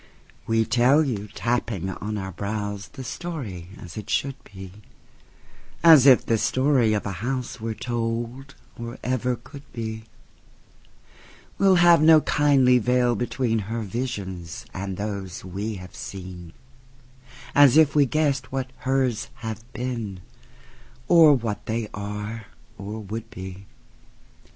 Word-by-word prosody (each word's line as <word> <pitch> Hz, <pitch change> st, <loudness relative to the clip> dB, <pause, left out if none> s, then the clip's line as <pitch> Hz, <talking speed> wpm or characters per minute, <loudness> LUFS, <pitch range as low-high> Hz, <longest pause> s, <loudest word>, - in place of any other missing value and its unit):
We 115 Hz, 0 st, +2 dB
tell 125 Hz, +7 st, +4 dB
you, 110 Hz, -8 st, -3 dB
tapping 115 Hz, -4 st, -2 dB
on 105 Hz, +2 st, -5 dB
our 95 Hz, -1 st, -4 dB
brows, 100 Hz, +1 st, -4 dB
The 135 Hz, -, -9 dB
story 120 Hz, -, -6 dB
as 85 Hz, +1 st, -10 dB
it 105 Hz, -, -7 dB
should 135 Hz, 0 st, 0 dB
be,—As 105 Hz, -, 0 dB
if 130 Hz, -3 st, +7 dB
the 115 Hz, -1 st, +1 dB
story 130 Hz, -4 st, +2 dB
of 105 Hz, -, -1 dB
a 100 Hz, -, -3 dB
houseWere 120 Hz, -3 st, -3 dB
told, 120 Hz, +3 st, -3 dB, 0.2 s
or 120 Hz, +1 st, -7 dB
ever 125 Hz, 0 st, 0 dB
could 140 Hz, +4 st, -12 dB
be; 110 Hz, -1 st, -5 dB, 1.5 s
We'll 195 Hz, -1 st, +5 dB
have 175 Hz, -2 st, +6 dB
no 155 Hz, 0 st, +7 dB
kindly 135 Hz, -5 st, +4 dB
veil 125 Hz, +1 st, +2 dB
betweenHer 115 Hz, -2 st, -1 dB
visions 95 Hz, -, -5 dB
and 95 Hz, -1 st, -5 dB
those 100 Hz, -4 st, -5 dB
we 100 Hz, +4 st, -4 dB
have 90 Hz, -2 st, -10 dB
seen,—As 125 Hz, -, -2 dB
if 155 Hz, -2 st, +5 dB
we 145 Hz, -2 st, +4 dB
guessed 140 Hz, -3 st, 0 dB
what 130 Hz, -1 st, -3 dB
hers 130 Hz, -3 st, 0 dB, 0.2 s
have 110 Hz, -1 st, -4 dB
been, 115 Hz, -7 st, -4 dB, 0.9 s
Or 160 Hz, -4 st, +7 dB
what 115 Hz, -4 st, -4 dB
they 110 Hz, -1 st, -2 dB
are 105 Hz, +2 st, -5 dB, 0.3 s
or 105 Hz, +2 st, -6 dB
would 110 Hz, +2 st, -6 dB
be. 95 Hz, -3 st, -9 dB
115 Hz, 120 wpm, -24 LUFS, 105-130 Hz, 1.5 s, if